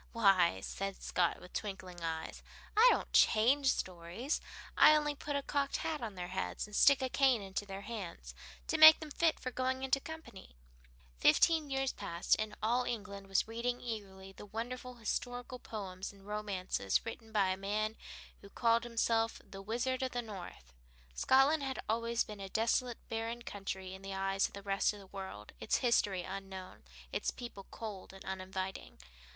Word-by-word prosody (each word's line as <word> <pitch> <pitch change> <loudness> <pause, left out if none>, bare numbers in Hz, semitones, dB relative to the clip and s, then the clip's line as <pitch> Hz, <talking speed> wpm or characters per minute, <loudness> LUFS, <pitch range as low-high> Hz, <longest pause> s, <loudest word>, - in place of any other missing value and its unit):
"Why," 195 - +4
said 195 - -4
Scott, 175 -2 +1
with 180 - -14
twinkling 185 -4 -5
eyes, 160 -1 -4 0.3
"I 445 +4 +8
don't - - -1
change 265 +6 +5
stories. 185 - -2 0.3
I 305 - +8
only 295 -1 +1
put 290 0 -4
a 280 - 0
cocked 280 -1 0
hat 310 -3 -2
on 220 -4 -5
their 180 -1 -5
heads, 190 +1 -3
and 210 0 -9
stick 280 +3 +6
a - - +1
cane 255 -4 +3
into 195 +1 -4
their 195 0 -6
hands 200 -5 -7 0.3
to 320 - -1
make 315 0 +11
them 310 -2 -8
fit 330 +2 +2
for 255 - -4
going 260 +1 -1
into 265 +1 +2
company." 320 - -10 0.6
Fifteen 310 - +5
years 270 -1 0
passed 175 -4 +1
and 215 -1 -3
all 240 +3 +2
England 205 -4 -5
was 195 +1 +1
reading 240 +2 -2
eagerly 195 -5 -6
the 205 - -12
wonderful 245 +3 -5
historical 245 +2 -3
poems 195 -5 -6
and 195 -1 -18
romances 200 - -1
written 225 -1 -7
by 200 -3 +3
a 185 - +1
man 210 +3 -1 0.5
who 200 - -13
called 230 +2 +2
himself 230 -1 +1
the 195 - -9
"Wizard 245 +5 -1
of 260 -1 -2
the 245 0 -1
North." 180 - -9 0.4
Scotland 270 - +4
had 270 -1 -3
always 230 +1 +1
been 210 -1 -9
a 195 -1 -6
desolate 235 +3 0
barren 230 +1 -3
country 190 -3 -5
in 190 - -9
the 195 0 -5
eyes 195 0 +1
of - - -18
the 200 - -8
rest 195 +1 +1
of 205 - -10
the 195 - -12
world, 190 - -8
its - - +1
history 205 -7 +2
unknown, 190 0 -7 0.3
its - - -1
people 235 -6 -8
cold 210 -4 -7
and 195 - -12
uninviting. 190 0 -5
215 Hz, 175 wpm, -34 LUFS, 195-250 Hz, 0.6 s, make